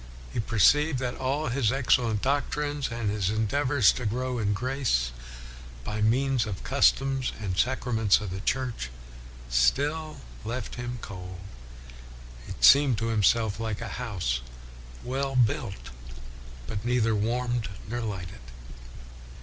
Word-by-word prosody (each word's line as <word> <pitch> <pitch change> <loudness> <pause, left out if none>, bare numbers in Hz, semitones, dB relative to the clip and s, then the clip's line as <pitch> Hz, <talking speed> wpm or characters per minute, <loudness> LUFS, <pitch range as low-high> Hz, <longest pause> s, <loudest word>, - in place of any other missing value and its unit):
He - - -2
perceived 130 - +3
that 125 -1 -2
all 135 +1 -1
his 120 -2 +1
excellent 120 -5 +2
doctrines, 145 +1 -1
and 115 -3 -2
his 100 -3 0
endeavors 125 +3 +3
to 125 - -3
grow 125 +3 -2
in 105 -2 0
grace 115 - 0 0.7
by 105 +10 -3
means 125 +1 +2
of 105 - -3
the - - -10
customs 135 -1 +2
and 100 -4 -3
sacraments 115 -3 +2
of 105 -4 -5
the 95 - -4
Church, 125 - -2 0.6
still 145 - +1 0.2
left 120 +1 -4
him 120 0 -5
cold. 90 -1 -8 1.1
He - - -5
seemed 135 - +7
to 115 +1 -1
himself 110 0 +2
like 110 -2 -3
a - - -5
house 85 - -2 0.6
well 135 +2 -2
built, 105 - 0 0.7
but 100 +7 -5
neither 120 -2 +2
warmed 120 +2 -1 0.2
nor 120 +2 -3
lighted. 90 - -6
115 Hz, 130 wpm, -27 LUFS, 105-130 Hz, 1.1 s, seemed